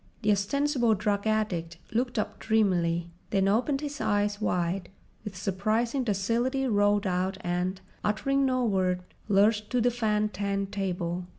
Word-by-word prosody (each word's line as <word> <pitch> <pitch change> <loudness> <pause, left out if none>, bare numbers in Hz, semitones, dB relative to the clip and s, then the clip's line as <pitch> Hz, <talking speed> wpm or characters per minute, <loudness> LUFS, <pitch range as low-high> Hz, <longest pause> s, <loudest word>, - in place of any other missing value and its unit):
The 210 - +4
ostensible 240 +3 +2
drug 205 +1 -1
addict 180 -7 -1
looked 245 +2 -1
up 215 - -2
dreamily, 175 -6 +1 0.2
then 195 -1 +2
opened 250 +7 +1
his 290 -1 -5
eyes 205 0 0
wide, 180 -1 -1 0.3
with 205 -4 -7
surprising 215 +7 0
docility 235 +6 0
rolled 205 -3 +2
out 185 +1 0
and, 180 +2 -1 0.2
uttering 275 +6 +1
no 255 -2 +2
word, 185 -4 +1 0.3
lurched 210 +2 +3
to 250 - +1
the 245 +1 +3
fan 215 -3 +1
tan 200 0 -2
table. 180 -3 -3
205 Hz, 140 wpm, -28 LUFS, 185-230 Hz, 0.3 s, The